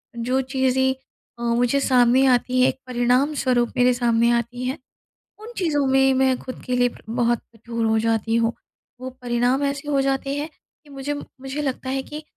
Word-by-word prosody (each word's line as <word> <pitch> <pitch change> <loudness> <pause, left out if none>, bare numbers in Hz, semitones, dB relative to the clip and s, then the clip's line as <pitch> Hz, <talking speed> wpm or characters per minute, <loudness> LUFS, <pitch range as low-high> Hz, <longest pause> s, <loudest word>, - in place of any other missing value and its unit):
जो 250 +3 0
चीज़ें 265 0 +1 0.5
अ, - - -9
मुझे 245 +3 +2
सामने 255 -1 +4
आती 255 0 +2
हैं, 255 - +6
एक - - -6
परिणाम 250 +4 +1
स्वरूप 245 -2 +1
मेरे 250 0 +4
सामने 235 -1 +2
आती 245 +2 -4
हैं, 260 +2 -2 0.6
उन 440 +3 -10
चीज़ों 300 -6 +1
में 270 0 +4
मैं 260 0 +2
ख़ुद 255 - -8
के 250 - -1
लिए 245 0 +3 0.2
बहुत 240 0 +1 0.2
कठोर 230 +1 -4
हो 220 0 +2
जाती 225 0 0
हूँ। 230 0 +2 0.5
वो 255 - -5
परिणाम 245 +3 +1
ऐसे 280 +1 -3
हो 280 -2 +2
जाते 275 0 -1
हैं 295 +2 -3 0.4
कि 295 - -18
मुझे 275 +1 -4
मुझे 275 0 -7
लगता 260 -1 -3
है 270 0 -1
कि 300 +3 -8
255 Hz, 185 wpm, -22 LUFS, 240-270 Hz, 0.6 s, हैं